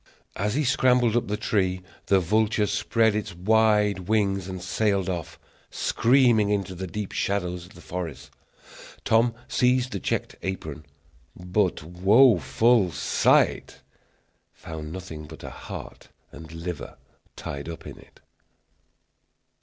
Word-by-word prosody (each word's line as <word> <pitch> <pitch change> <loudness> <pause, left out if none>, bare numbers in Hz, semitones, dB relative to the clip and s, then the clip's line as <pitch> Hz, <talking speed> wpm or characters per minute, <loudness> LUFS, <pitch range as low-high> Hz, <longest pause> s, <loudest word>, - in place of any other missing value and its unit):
As 105 +4 -1
he 150 - +1
scrambled 125 -3 +3
up 120 - +1
the 105 +1 -2
tree, 95 -4 0 0.2
the 95 - +4
vulture 105 +4 +1
spread 110 +2 +1
its 105 -5 -4
wide 105 -1 +2
wings 100 -4 +1
and 95 -1 -5
sailed 100 +1 0
off, 85 -4 -4 0.3
screaming, 120 -4 +3
into 100 -3 -1
the 95 +1 -6
deep 100 +3 -5
shadows 90 -3 -2
of 90 - -19
the 85 - -13
forest. 90 -5 -6 0.7
Tom 115 +1 +3
seized 125 0 +2
the 100 - -3
checked - - -2
apron, 80 -6 -5 0.5
but, 90 -1 -1
woful 100 - +4
sight! - - +1 0.7
found 80 -1 -8
nothing 80 -4 -8
but 80 +1 -12
a - - -7
heart - - -9 0.2
and 80 -1 -11
liver 80 -2 -6 0.4
tied 70 +3 -6
up 85 - -8
in - - -9
it! - - -20
95 Hz, 130 wpm, -25 LUFS, 90-110 Hz, 0.7 s, the